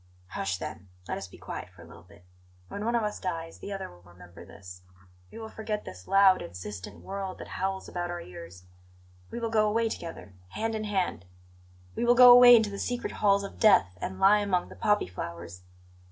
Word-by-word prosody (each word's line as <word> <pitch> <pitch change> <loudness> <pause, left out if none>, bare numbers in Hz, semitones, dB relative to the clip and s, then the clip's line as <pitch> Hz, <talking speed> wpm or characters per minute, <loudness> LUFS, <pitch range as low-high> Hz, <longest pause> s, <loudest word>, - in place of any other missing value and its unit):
"Hush, 95 -1 -3
then! 90 +1 -8 0.2
Let - - -3
us 95 - -8
be - - -15
quiet - - -7
for 90 -2 -16
a - - -14
little - - -14
bit. 90 0 -20 0.4
When 205 - -6
one 235 +1 0
of 235 - +1
us 210 0 -3
dies, 165 -3 -5
the 200 - -8
other 195 -1 -5
will 90 0 -17
remember 90 0 -15
this. 90 -2 -12 0.5
We - - -12
will 225 -1 -7
forget 215 -1 -5
this 90 0 -11
loud, 195 -1 +5
insistent 90 +2 -8
world 195 -1 -5
that - - -10
howls 190 0 -3
about 175 -1 -4
our 175 0 -4
ears; 90 - -11 0.7
we - - -6
will 230 -1 -3
go 215 -1 +3
away 225 +1 +1
together, 165 - -8 0.2
hand 225 +1 -2
in 215 -1 -3
hand; 185 - -2 0.7
we - - -2
will 240 0 +4
go 250 0 +9
away 245 0 +10
into 220 -3 +2
the 200 - -6
secret 245 0 -3
halls 200 -1 +2
of 200 - -9
death, 185 - +4
and 95 - -5
lie 205 +2 +6
among 195 -3 -1
the - - -12
poppy 210 0 +1
flowers. 85 0 -8
190 Hz, 210 wpm, -28 LUFS, -, 0.7 s, away